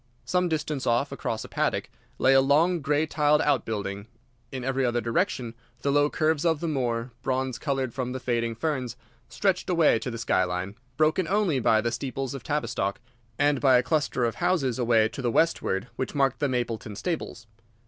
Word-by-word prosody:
Some 180 -1 +1
distance 150 -3 -2
off, 120 +4 +1
across 115 -5 -3
a - - -8
paddock, - - -1 0.3
lay 135 - +4
a 135 - +6
long 160 +6 +3
grey 145 +2 +1
tiled 150 -1 +2
out 140 -5 +1
building. 100 -1 -4 0.4
In 130 -2 -5
every 135 +1 0
other 120 -1 +1
direction 120 - -1 0.3
the 140 - +2
low 145 +1 +3
curves 155 -1 +1
of 165 -3 +2
the 170 - -3
moor, 125 -5 -1
bronze 130 -1 -1
coloured 135 -4 -2
from 125 -2 -3
the 130 - -4
fading 115 -2 -1
ferns, 130 -2 -2 0.3
stretched 190 -2 0
away 165 -9 +4
to 125 - -4
the 115 - -5
sky 100 -4 +1
line, 90 +2 -3 0.2
broken 155 +3 +2
only 195 -8 +1
by 110 -2 +3
the 120 +1 -1
steeples 135 0 -4
of 135 - -6
Tavistock, 120 -8 -2 0.4
and 145 -2 +2
by 130 -3 +6
a 125 - +2
cluster 145 -3 0
of 115 -2 -2
houses 135 -9 +1
away 115 -2 +4
to 135 - -7
the 120 - 0
westward 115 -8 +1
which 130 - -3
marked 135 -2 +1
the 145 - +1
Mapleton 115 -4 -3
stables. 155 - -4
135 Hz, 190 wpm, -26 LUFS, 120-150 Hz, 0.4 s, a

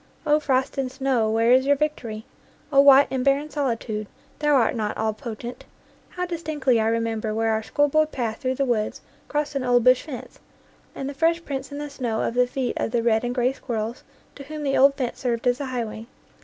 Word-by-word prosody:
O 300 0 +4
frost 270 -2 0
and 260 -2 -1
snow, 265 -5 0
where 225 +2 +3
is 260 +2 +5
your 285 - +5
victory? 250 -7 -3 0.5
O 275 - +6
white 280 0 +7
and 260 -1 -1
barren 280 +3 +1
solitude, 230 -7 -2 0.3
thou 295 -1 +3
art 240 -4 +3
not 215 -2 -2
all 220 0 0
potent! 235 +2 -7 0.5
How 360 - -3
distinctly 305 -8 0
I 220 - +1
remember 225 -1 -1
where 225 0 +1
our 220 0 0
schoolboy 290 +7 +2
path 235 -7 -3
through 260 0 -1
the 275 +1 0
woods 225 -4 -1 0.3
crossed 295 0 -2
an 275 -2 -2
old 245 -1 +3
bush 255 +1 +5
fence, 275 -6 -9 0.6
and 270 - -4
the 285 - -4
fresh 330 +3 +1
prints 270 0 -5
in 285 - -6
the 295 0 -4
snow 245 -6 -3
of - - -1
the 250 0 +3
feet 250 0 -2
of - - -1
the 230 0 0
red 225 -1 +2
and 245 0 -2
gray 250 +1 +2
squirrels 230 -3 -4 0.3
to 280 - -10
whom 305 +1 -6
the 275 -1 0
old 275 +1 +5
fence 255 -4 -3
served 235 -2 -2
as 245 0 +2
a - - -2
highway. 230 -3 -4
255 Hz, 215 wpm, -24 LUFS, 230-280 Hz, 0.6 s, white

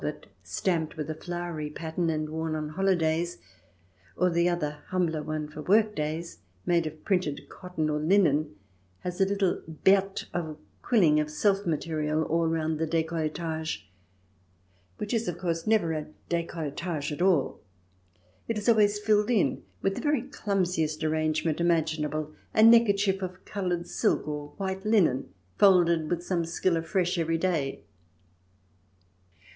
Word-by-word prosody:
ix - - -4
stamped 165 -4 -1
with 155 0 -3
a - - -2
flowery 170 -2 -5
pattern, 165 +2 -2
and 155 -1 -1
worn 160 0 -3
on 155 -1 -3
holidays, 170 -1 +1 0.8
or 180 0 +2
the 170 +1 +3
other 150 -4 -2
humbler 170 -4 0
one 155 0 -3
for 150 0 -8
work 210 +5 +3
days, 155 +3 -3 0.3
made 170 -2 +2
of 155 0 -9
printed 180 -7 0
cotton 180 -4 -3
or 150 0 0
linen, 155 - +2 0.5
has 180 +1 -4
a - - +6
little 200 -2 0
berthe 190 +5 +2
of 160 -3 -3 0.2
quilling 170 -11 +4
of 150 0 -1
self 195 +5 +1
material 155 -1 0
all 165 +1 +1
round 160 -1 -1
the 160 - 0
decolletage, 160 - -2 1.1
which 210 - -4
is, 230 -1 0
of 175 -1 -2
course, 165 -1 -2
never 210 -7 +3
a 155 -1 -3 0.2
decolletage 165 -2 -3
at 150 - -4
all. 180 -7 +2 0.9
It 230 - -1
is 210 - -4
always 210 -3 +4
filled 210 +1 +2
in 230 -5 +2 0.2
with 195 - +2
the - - -5
very 295 -5 +1
clumsiest 180 - -1
arrange 155 0 0
ment 160 0 0
imaginable, 155 -2 0 0.2
a 215 - +6
neckerchief 205 -4 +5
of 185 0 -6
coloured 180 -3 -2
silk - - 0
or 150 -1 -4
white 190 -1 -3
linen, 180 - +2 0.3
folded 170 -5 +5
with 175 -1 -1
some 175 -2 0
skill 170 +2 0
afresh 175 +2 0
every 165 0 +1
day. 160 -6 -1
170 Hz, 150 wpm, -28 LUFS, 155-190 Hz, 1.1 s, a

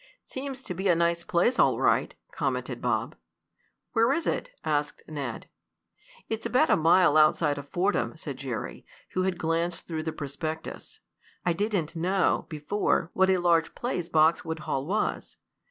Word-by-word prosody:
"Seems 270 0 -6
to 180 - -5
be 190 +3 -2
a 175 - +5
nice 170 0 +1
place 180 +11 +2
all - - +4
right," - - +2 0.2
commented - - -2
Bob. - - -1 0.8
"Where 230 +3 +3
is 325 +4 0
it?" - - -1
asked 150 -1 -1
Ned. 140 -7 -5 0.8
"It's 225 0 -3
about 305 +6 +3
a - - +7
mile 165 -1 +5
outside 155 -1 +4
of 145 - -10
Fordham," 185 -2 0
said 140 -4 -6
Jerry, 125 -6 -5 0.3
who 185 - -1
had 185 -1 0
glanced 165 +1 -1
through 160 -2 -3
the 160 0 -3
prospectus. 155 +2 -6 0.5
"I 175 - +3
didn't 180 -4 -1
know, 180 +3 +1
before, 160 +3 0
what 190 0 +3
a 190 - +4
large 170 -2 +2
place 180 -9 -3
Boxwood 160 0 +2
Hall 135 -1 -2
was. 210 +4 -2
170 Hz, 155 wpm, -27 LUFS, 155-190 Hz, 0.8 s, a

